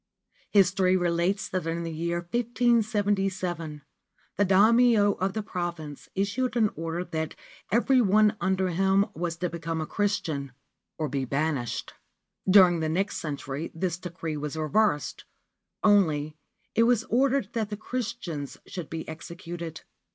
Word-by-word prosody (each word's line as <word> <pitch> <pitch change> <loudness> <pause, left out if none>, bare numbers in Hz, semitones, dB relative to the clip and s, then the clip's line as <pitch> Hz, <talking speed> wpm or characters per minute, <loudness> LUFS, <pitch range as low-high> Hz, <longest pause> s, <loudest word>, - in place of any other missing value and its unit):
History 185 -1 +4
relates 175 +2 0
that 185 -3 -3
in 165 +1 -2
the 165 - -4
year 170 +2 -2
1577 200 -7 0 0.5
the 205 - +3
Daimio 215 +2 +5
of 190 +1 0
the 215 - -2
province 170 -6 -5
issued 225 +6 0
an 220 -3 +3
order 165 +2 -3
that 160 -3 -4 0.4
every 250 +3 +4
one 215 0 +4
under 190 -1 +1
him 190 +3 +3
was 170 +1 -3
to 180 - -1
become 165 -1 -3
a 155 - -2
Christian 165 -10 -2 0.4
or 155 - -1
be 135 -1 -2
banished. 140 -2 -2 0.6
During 185 -3 +7
the 160 -1 -1
next 195 +5 0
century 145 0 -4
this 175 0 -2
decree 165 -3 -5
was 150 +1 -4
reversed; 155 0 0 0.6
only, 155 -8 +3 0.4
it - - +3
was 235 -3 +3
ordered 260 -2 +1
that 220 -3 -1
the 210 - -4
Christians 215 - -4
should 175 -5 -7
be 160 0 -5
executed. 170 0 -7
180 Hz, 135 wpm, -27 LUFS, 160-205 Hz, 0.6 s, During